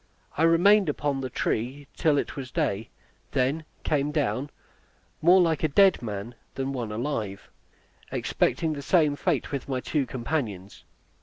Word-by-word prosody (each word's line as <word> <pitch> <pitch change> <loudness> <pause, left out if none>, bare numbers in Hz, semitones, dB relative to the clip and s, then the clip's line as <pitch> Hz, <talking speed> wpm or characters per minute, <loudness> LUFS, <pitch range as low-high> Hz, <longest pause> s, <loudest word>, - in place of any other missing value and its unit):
I - - -2
remained 175 +3 +5
upon 145 -2 -1
the 130 - -3
tree 130 +5 -2
till 155 -4 +2
it - - -2
was 130 -2 -6
day, 145 - 0
and 110 - -9 0.5
then 140 +5 0 0.2
came 145 -1 +1
down, 145 -2 -1 0.7
more 180 +4 +6
like 165 -4 +2
a - - +4
dead 190 +6 +4
man 105 0 -5 0.2
than 135 0 -2
one 120 -5 -4
alive, 110 -4 -4 0.6
expecting 160 -2 0
the 145 - -5
same 150 -1 +3
fate 155 -2 -1
with 140 -1 -4
my 130 -1 0
two 140 +1 -1
companions. 115 - -4
140 Hz, 155 wpm, -26 LUFS, 125-160 Hz, 0.7 s, more